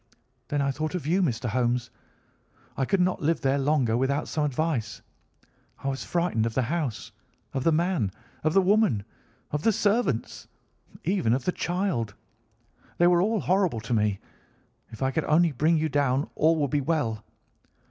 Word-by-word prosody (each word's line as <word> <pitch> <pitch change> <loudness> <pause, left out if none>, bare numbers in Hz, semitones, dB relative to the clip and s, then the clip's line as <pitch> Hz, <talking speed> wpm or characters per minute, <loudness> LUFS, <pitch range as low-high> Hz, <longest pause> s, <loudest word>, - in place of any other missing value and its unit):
Then 145 -1 0
I 140 - +1
thought 155 +5 -3
of 180 - -4
you, 175 +5 +2
Mr. 125 -8 -1
Holmes. 120 +1 0 0.8
I 135 - 0
could 190 +7 +1
not 180 0 +1
live 160 +2 +1
there 135 +1 +1
longer 135 -5 +2
without 135 +3 0
some 155 - -1
advice. 140 -5 -2 0.8
I 135 - 0
was 135 0 -3
frightened 170 -11 0
of 115 - -5
the 130 - +2
house, 140 -3 -3 0.4
of 135 -2 -2
the 165 - +4
man, 160 - +1 0.3
of 155 0 +1
the 195 - +5
woman, 195 - +3 0.5
of 150 - -1
the 225 - +3
servants, 205 - 0 0.6
even 175 - +1
of 130 - -4
the - - +2
child. 175 - -2 0.8
They 175 - +4
were 175 0 +5
all 215 +2 +1
horrible 185 - +1
to 115 +2 -3
me. 105 -3 +1 0.7
If 115 +2 -6
I 130 - +1
could 160 +3 -1
only 165 +2 +3
bring 155 +5 +2
you 160 0 +1
down 140 -2 +1
all 160 +2 +3
would 145 -4 -1
be 145 -1 +1
well. 130 -8 -1
150 Hz, 175 wpm, -26 LUFS, 125-175 Hz, 0.8 s, the